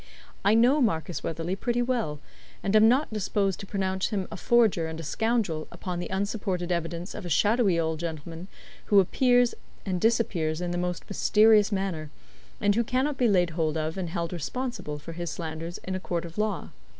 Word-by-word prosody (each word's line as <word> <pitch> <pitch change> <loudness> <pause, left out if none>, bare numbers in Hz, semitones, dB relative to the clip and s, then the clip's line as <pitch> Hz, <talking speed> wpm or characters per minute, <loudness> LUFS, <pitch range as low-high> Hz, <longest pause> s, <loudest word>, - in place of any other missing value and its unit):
I 205 +2 +4
know 250 +6 +5
Marcus 175 -7 0
Weatherley 165 +3 -3
pretty 240 +4 0
well, 235 - -1 0.4
and 195 - +1
am 215 +1 +7
not 260 0 +2
disposed 200 -2 0
to 200 - -8
pronounce 190 -1 -1
him 200 -4 -2
a - - -5
forger 220 -9 +3
and 160 0 -6
a - - -5
scoundrel 205 -2 -1
upon 180 -2 -5
the 175 - -4
unsupported 190 -2 -2
evidence 170 +1 -3
of - - -7
a 175 - -5
shadowy 205 +1 +3
old 160 -1 -1
gentleman 165 +1 -6 0.4
who 205 - +5
appears 245 +5 +3 0.3
and 185 -3 -2
disappears 180 -9 +1
in 175 -1 -2
the 175 - -2
most 180 -1 -3
mysterious 210 +1 +4
manner, 190 -6 -2 0.5
and 205 - +3
who 235 +3 +2
cannot 265 +5 0
be 245 - +4
laid 180 -5 +3
hold 160 -1 -1
of 155 +1 -2
and 185 -3 -3
held 170 0 -3
responsible 175 - -4
for 150 +3 -9
his 175 0 -4
slanders 165 +1 -5
in 185 - -4
a 185 - -2
court 175 -2 -3
of 170 +3 -8
law. 210 -3 -1
185 Hz, 190 wpm, -27 LUFS, 165-220 Hz, 0.5 s, am